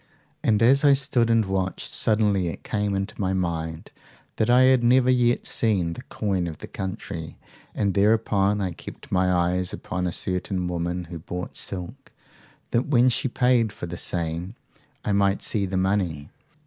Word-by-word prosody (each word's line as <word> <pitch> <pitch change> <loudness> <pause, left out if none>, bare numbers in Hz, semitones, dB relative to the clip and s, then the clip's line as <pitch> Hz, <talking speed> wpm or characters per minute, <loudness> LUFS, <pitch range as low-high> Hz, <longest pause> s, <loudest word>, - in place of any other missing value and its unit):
"'And 110 0 +3
as 135 +4 +5
I 145 -1 +7
stood 130 -4 +1
and 115 -2 +3
watched, 95 -1 -2
suddenly 105 -4 +2
it 85 - -6
came 105 -2 -1
into 95 +1 -4
my 95 -1 0
mind 80 -3 -3 0.5
that 110 - +1
I 125 +1 +6
had 130 -1 +4
never 125 +1 +4
yet 120 -1 +2
seen 95 -7 +1
the - - -8
coin 95 -4 -2
of 80 -3 -6
the - - -8
country, 95 -4 -6 0.4
and 100 -2 0
thereupon 105 0 +2
I 95 -2 -1
kept 85 - -11
my 90 0 +2
eyes 90 +1 +1
upon 90 0 -3
a - - -1
certain 90 +1 -2
woman 90 +1 -2
who 85 0 -8
bought 90 +2 -6
silk, 100 +9 -6 0.6
that 120 +2 +1
when 130 -3 +4
she 125 - +1
paid 125 -3 +2
for 85 - -7
the 85 0 -6
same 85 +3 -3 0.5
I - - 0
might 100 0 +2
see 100 -3 +1
the 95 0 -2
money. 95 -6 -1
95 Hz, 175 wpm, -24 LUFS, 90-115 Hz, 0.6 s, I